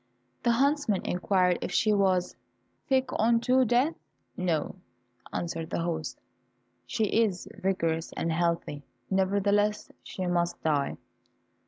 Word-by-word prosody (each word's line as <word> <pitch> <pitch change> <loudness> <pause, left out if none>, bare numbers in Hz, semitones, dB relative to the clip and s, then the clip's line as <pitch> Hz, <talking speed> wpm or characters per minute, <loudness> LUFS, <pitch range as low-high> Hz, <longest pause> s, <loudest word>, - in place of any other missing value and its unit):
The 235 - +3
huntsman 275 -5 +1
inquired 180 0 +2
if - - -3
she 215 -1 +3
was 190 -3 +2 0.5
"sick 265 -1 +2
unto 235 +3 +4
death?" 245 +7 +2 0.4
"No," 175 0 -1 0.5
answered 165 -1 -3
the 170 - -2
host, 165 -2 -3 0.7
"she 220 - -1
is 210 -3 +1
vigorous 165 -4 -1
and 165 - -2
healthy, 170 -3 -1 0.3
nevertheless 200 +2 +1
she 185 - -5
must 175 -1 0
die!" 145 -3 0
190 Hz, 115 wpm, -28 LUFS, 170-220 Hz, 0.7 s, unto